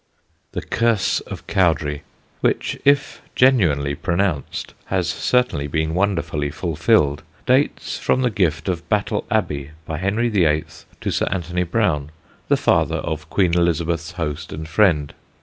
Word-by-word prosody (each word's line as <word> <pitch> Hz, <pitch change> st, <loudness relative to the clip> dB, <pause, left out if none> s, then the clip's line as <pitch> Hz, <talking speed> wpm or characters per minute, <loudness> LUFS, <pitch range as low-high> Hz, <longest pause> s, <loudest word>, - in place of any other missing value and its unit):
The -, -, -3 dB
curse 115 Hz, -4 st, +1 dB
of -, -, -8 dB
Cowdray, 80 Hz, -6 st, +1 dB, 0.4 s
which, -, -, 0 dB
if 140 Hz, 0 st, +2 dB
genuinely 85 Hz, -, +3 dB
pronounced, 85 Hz, 0 st, -2 dB
has -, -, 0 dB
certainly 125 Hz, -, +1 dB
been 80 Hz, +2 st, -1 dB
wonderfully 85 Hz, -6 st, 0 dB
fulfilled, 80 Hz, -1 st, +1 dB, 0.2 s
dates 130 Hz, +3 st, +1 dB
from 130 Hz, -, +1 dB
the 125 Hz, -, +2 dB
gift 85 Hz, -5 st, 0 dB
of 85 Hz, -2 st, -3 dB
Battle 105 Hz, -2 st, 0 dB
Abbey 70 Hz, -1 st, -1 dB, 0.2 s
by 80 Hz, 0 st, -4 dB
Henry 105 Hz, +6 st, +1 dB
VIII. 80 Hz, -8 st, +2 dB, 0.4 s
to -, -, -1 dB
Sir -, -, 0 dB
Anthony 90 Hz, -1 st, -2 dB
Browne, 85 Hz, -6 st, 0 dB, 0.4 s
the -, -, +3 dB
father -, -, +2 dB
of 80 Hz, -1 st, -4 dB
Queen 90 Hz, -4 st, +2 dB
Elizabeth's 85 Hz, -1 st, 0 dB
host 80 Hz, -2 st, -4 dB
and 80 Hz, +1 st, -6 dB
friend. 80 Hz, -5 st, +2 dB
85 Hz, 135 wpm, -21 LUFS, 75-100 Hz, 0.4 s, genuinely